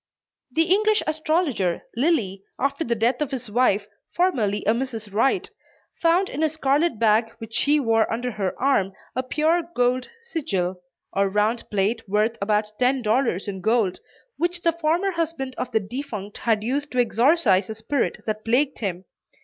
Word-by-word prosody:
The 325 - +4
English 425 +5 +3
astrologer 310 - 0
Lilly, 230 - +1 0.2
after 280 +3 0
the 235 -4 0
death 235 +5 +1
of 295 - 0
his 250 -5 -5
wife, 215 -3 +2 0.3
formerly 225 - +1
a 215 - +4
Mrs. 230 -5 -4
Wright, 270 - +2 0.5
found 345 +3 +3
in 295 - -4
a 315 - +3
scarlet 295 -2 +1
bag 225 +1 +3
which 225 -1 -10
she 295 +5 +3
wore 225 -4 +2
under 245 +2 -2
her 195 -4 -3
arm 225 -8 +2 0.2
a 255 - +1
pure 310 +6 +1
gold 250 +1 +1
"sigil" 190 - -2 0.3
or 195 0 +2
round 210 +4 0
plate 210 +3 0
worth 215 +3 +2
about 210 +1 +1
ten 255 0 +2
dollars 220 -4 +1
in 190 -2 -5
gold, 220 -3 +1 0.4
which 345 +2 -1
the 335 - +4
former 335 +4 +1
husband 330 -6 -3
of - - -2
the 220 - +3
defunct 210 -2 -6
had 220 -3 +1
used 285 +5 -2
to 250 - 0
exorcise 235 - +3
a 220 - -4
spirit 235 +5 -2
that 215 0 -3
plagued 265 +5 +1
him. 190 -4 -3
245 Hz, 165 wpm, -24 LUFS, 210-300 Hz, 0.5 s, The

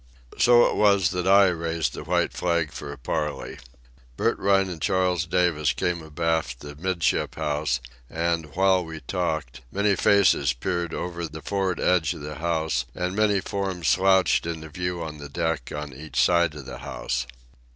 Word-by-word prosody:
So 120 0 +6
it - - 0
was 100 -4 +4
that 90 0 -2
I 100 0 +7
raised 85 -1 -2
the - - -7
white - - 0
flag 85 -3 0
for 70 -2 -7
a 70 - -8
parley. 75 +4 -3 0.6
Bert - - +1
Rhine 95 -1 +3
and 85 -4 -7
Charles 90 -2 +1
Davis 85 -4 +1
came 85 -1 -1
abaft 80 -4 -2
the 75 0 -8
'midship 85 +1 0
house, 75 -4 -1 0.3
and, 85 -2 -2
while 95 -1 +3
we 80 -2 -8
talked, 80 -4 -3
many 100 0 +2
faces 90 -9 +4
peered 85 +5 -3
over 85 -1 -4
the 80 0 -10
for'ard 95 -3 -1
edge 85 -4 +2
of - - -9
the 75 0 -7
house 80 -6 0
and 90 +1 -2
many 105 -2 +2
forms 95 -5 -2
slouched 95 -2 +3
into 80 -2 -5
view 90 +1 -3
on 75 -2 -7
the 70 0 -8
deck 80 -3 -2
on 75 -2 -5
each 70 -1 -5
side 85 +3 +3
of 75 -3 -9
the 65 - -8
house. 60 0 -3
85 Hz, 170 wpm, -25 LUFS, 75-90 Hz, 0.6 s, I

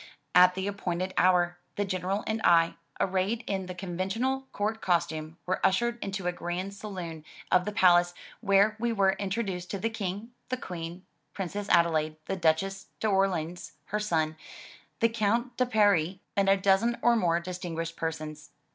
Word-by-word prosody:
At 180 0 +7
the 190 0 -2
appointed 185 -2 -2
hour, 175 -1 +3 0.2
the 205 - 0
General 190 +2 -2
and 220 0 -2
I, 165 -1 +5 0.3
arrayed 195 +5 0
in 190 -2 -2
the 180 - -6
conventional 195 +9 -2
court 215 +2 -2
costume, 165 -3 -1
were 185 - -2
ushered 235 +5 +1
into 195 -2 -4
a 180 - +2
grand 175 +3 -4
saloon 180 -6 -7 0.3
of 180 0 +4
the 210 - -2
palace, 175 -3 +4 0.2
where 200 0 +4
we 235 +1 0
were 195 -3 +3
introduced 190 -3 -3
to 200 - -3
the 225 +4 -2
King, 210 +1 -4 0.2
the 255 - -1
Queen, 175 -3 -7 0.3
Princess 200 +2 -4
Adelaide, 160 -2 +3
the 195 - -2
Duchess 190 +3 0
d^Orleans, 190 -5 0 0.2
her 210 - 0
son, 160 -6 0 0.6
the 230 - +5
Count 230 +3 0
de 255 0 +1
Paris, 200 -7 +3 0.2
and 195 -1 +3
a 195 - +5
dozen 200 +5 +2
or 240 0 +5
more 170 -6 +2
distinguished 170 -2 -5
persons. 155 -2 -5
190 Hz, 160 wpm, -28 LUFS, 175-205 Hz, 0.6 s, At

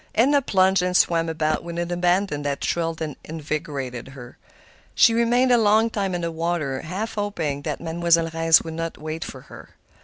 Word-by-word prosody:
Edna 280 +5 +4
plunged 190 -5 +3
and 180 0 +1
swam 165 -1 +2
about 155 -1 -1
with 170 0 -7
an 175 0 -3
abandon 175 -2 +1
that 145 -1 -2
thrilled 165 -1 -1
and 150 -3 -5
invigorated 145 -5 -5
her. 135 -3 -11 0.6
She 230 - +6
remained 240 +2 +2
a 240 - +5
long 220 +1 +3
time 195 -4 -2
in 175 - -3
the 170 0 -2
water, 160 -5 -2
half 195 +7 -4
hoping 170 -9 -3
that 150 0 -4
Mademoiselle 165 0 +1
Reisz 165 0 +4
would 160 - -6
not 165 0 -4
wait 155 +1 -5
for - - -9
her. - - -14
165 Hz, 185 wpm, -23 LUFS, 155-190 Hz, 0.6 s, She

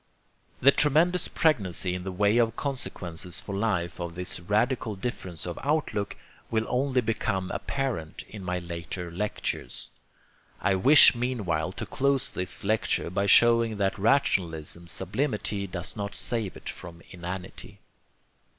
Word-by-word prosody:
The 140 - +8
tremendous 165 +6 +3
pregnancy 95 - +1
in 90 0 -4
the 95 - -4
way 100 +5 +3
of 115 -1 +2
consequences 90 - -5
for 100 - -7
life 95 -6 -1
of 85 -1 -5
this 90 0 -3
radical 110 +4 0
difference 95 -6 -5
of 85 -1 -5
outlook 140 -8 -1 0.3
will 110 -1 0
only 130 0 +1
become 100 -4 -1
apparent 120 - -3
in 105 -3 -9
my 90 0 -1
later 85 0 -5
lectures. 90 -9 -4 0.7
I 100 - +2
wish 135 +11 +8
meanwhile 105 -10 -1
to - - -5
close 140 0 0
this 90 +3 -3
lecture 105 -3 0
by 100 +2 0
showing 115 +1 +5
that 100 -1 0
rationalism's 85 - +1
sublimity 105 -1 -2
does 90 -1 -5
not 100 -1 -4
save 115 -6 -3
it - - -12
from 85 -2 -8
inanity. 90 0 -7
100 Hz, 135 wpm, -27 LUFS, 90-120 Hz, 0.7 s, The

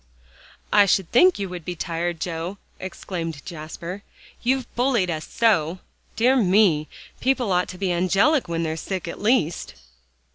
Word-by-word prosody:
"I 205 -1 +6
should 190 -2 +1
think 360 +9 +6
you 200 - -3
would 180 -2 -7
be 175 +2 -4
tired, 170 0 -3
Joe," 170 +3 -4 0.2
exclaimed 165 -5 -5
Jasper, 170 +4 -7 0.4
"you've 260 +1 +1
bullied 240 -8 +2
us 155 -1 -4
so. 185 -7 +2 0.4
Dear 245 +4 +4
me! 185 -8 +4 0.3
people 255 -5 +1
ought 180 0 +2
to 185 - -8
be 190 -1 -1
angelic 195 - +2
when 170 0 -2
they're 160 0 -2
sick, 185 +1 -4
at 170 - -6
least." 210 -7 +1
180 Hz, 150 wpm, -23 LUFS, 165-220 Hz, 0.4 s, I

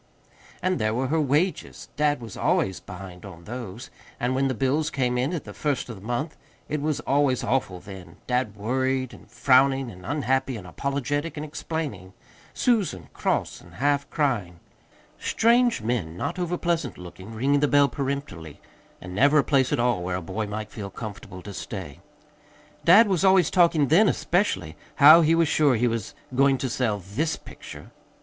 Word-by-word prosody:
And 185 0 +1
there 110 +1 0
were 130 +1 -1
her 160 +1 +2
wages 150 +6 -1
dad 145 -3 +1
was 115 -4 -8
always 95 -1 0
behind 90 -2 -10
on 85 -4 -11
those. 115 +1 -8 0.3
And 125 +1 0
when 135 +1 +1
the 130 - -1
bills 135 +6 0
came 125 -2 -1
in 125 +5 0
at 170 -4 -3
the - - -10
first 140 -5 -2
of 115 - -6
the 95 - -13
month, 120 +9 -3 0.3
it 150 0 -2
was 150 -1 -1
always 140 -3 +1
awful 110 -8 -1
then: 90 -3 -11
dad 125 -4 -1
worried 130 +4 -1
and - - -15
frowning 135 -1 +3
and 90 -2 -13
unhappy 130 - -1
and 100 - -10
apologetic 140 - -3
and 150 - -4
explaining; 145 - -5 0.4
Susan 190 - 0
cross - - -1
and - - -16
half 140 +1 0
crying. 110 - -1 0.6
Strange 235 - +2
men, 95 -9 -2
not 145 - -3
overpleasant 170 -4 -1
looking, 90 +3 -10
ringing 135 +6 +1
the 145 - +2
doorbell 145 -1 +4
peremptorily. 135 - -5 0.4
And 90 -1 -9
never 140 +9 +4
a 145 - +5
place 135 -3 +2
at 145 - +1
all 120 -5 +1
where 90 +1 -2
a 90 - -3
boy 105 +6 -4
might 105 +1 -5
feel 100 -3 -6
comfortable 100 -4 -8
to 100 - -8
stay. 90 -7 -7 0.8
Dad 205 +7 +7
was 190 -3 0
always 190 -4 +4
talking 170 -6 +3
then, 195 +7 +5
especially, 190 +4 0 0.2
how 155 +3 +9
he 165 +1 +3
was 165 -1 +3
sure 145 -3 +3
he 120 +2 +2
was 115 -3 -3 0.2
going 135 +1 +3
to 130 +1 -3
sell 115 -5 0
THIS 100 - -2
picture. - - -12
130 Hz, 175 wpm, -25 LUFS, 105-150 Hz, 0.8 s, how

